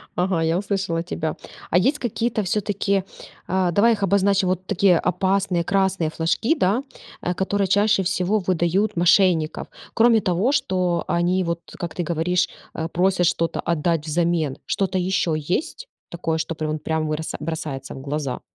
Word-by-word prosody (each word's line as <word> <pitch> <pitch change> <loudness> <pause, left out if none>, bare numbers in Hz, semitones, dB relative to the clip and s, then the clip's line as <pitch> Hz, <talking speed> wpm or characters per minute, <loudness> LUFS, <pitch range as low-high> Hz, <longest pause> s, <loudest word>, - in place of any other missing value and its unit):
Ага, 180 -2 0
я 165 +1 +1
услышала 195 -4 -1
тебя. 160 -3 -3 0.3
А 175 - +3
есть 270 +11 +2
какие-то 235 -1 -1
всё-таки, 200 0 0 0.4
а- 185 -1 +1
давай 225 +6 +4
их 200 -2 -3
обозначим, 195 0 +2
вот 185 0 -2
такие 190 -2 +3
опасные 185 -1 0
красные 190 -4 +2
флажки, 165 - 0
да, 225 - +1 0.4
э, 180 - -1
которые 195 +2 0
чаще 205 +1 +3
всего 185 +4 +1
выдают 185 +3 +1
мошенников. 175 -2 +3 0.3
Кроме 230 0 +5
того, 185 +8 +1
что 185 -10 0
они 175 +2 +1
вот, 170 -1 -2 0.2
как 175 -3 -5
ты - - +1
говоришь, 175 +2 +1 0.3
э, 160 - -3
просят 180 +1 +1
что-то 165 0 0
отдать 165 -1 0
взамен. 165 -3 0
Что-то 195 -1 -1
еще 180 -3 0
есть 330 - -2 0.2
такое, 165 -2 -2
что 160 +1 -3
прям 155 -1 -3
прям 160 +1 -1
броса 155 +1 -3
бросается 150 -4 -5
в 135 - -8
глаза? 140 -1 -3
180 Hz, 155 wpm, -22 LUFS, 165-195 Hz, 0.4 s, Кроме